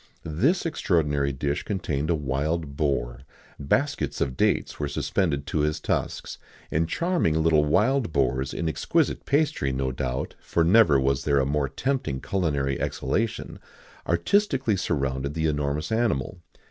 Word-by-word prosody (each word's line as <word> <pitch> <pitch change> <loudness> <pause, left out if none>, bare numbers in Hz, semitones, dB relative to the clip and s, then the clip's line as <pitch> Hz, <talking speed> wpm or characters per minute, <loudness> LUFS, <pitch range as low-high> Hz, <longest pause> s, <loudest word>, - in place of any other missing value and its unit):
This 125 - +1
extraordinary 75 - +1
dish 70 +2 -2
contained 80 -7 -2
a 85 - +3
wild 75 +2 -2
boar; 65 -5 -1 0.4
baskets 140 - 0
of 65 -2 -1
dates - - 0
were 75 - -1
suspended 70 +1 -1
to 75 - -2
his 75 +1 0
tusks, - - -3 0.3
and 80 +1 +1
charming 170 - +1
little 80 -2 +4
wild 110 - +2
boars, 65 -1 0
in 85 - -3
exquisite 155 - 0
pastry, 145 - +1
no 65 0 -1
doubt 65 0 -3
for 85 - +1
never 85 -5 +5
was 70 0 +1
there 70 -1 +2
a 65 - +2
more 70 0 0
tempting 130 - -2
culinary 70 -7 -1
exhalation 105 - -2 0.5
artistically 130 - +2
surrounded 70 -5 -2
the 80 0 0
enormous 75 +2 -1
animal. 100 - 0
75 Hz, 140 wpm, -25 LUFS, 70-95 Hz, 0.5 s, never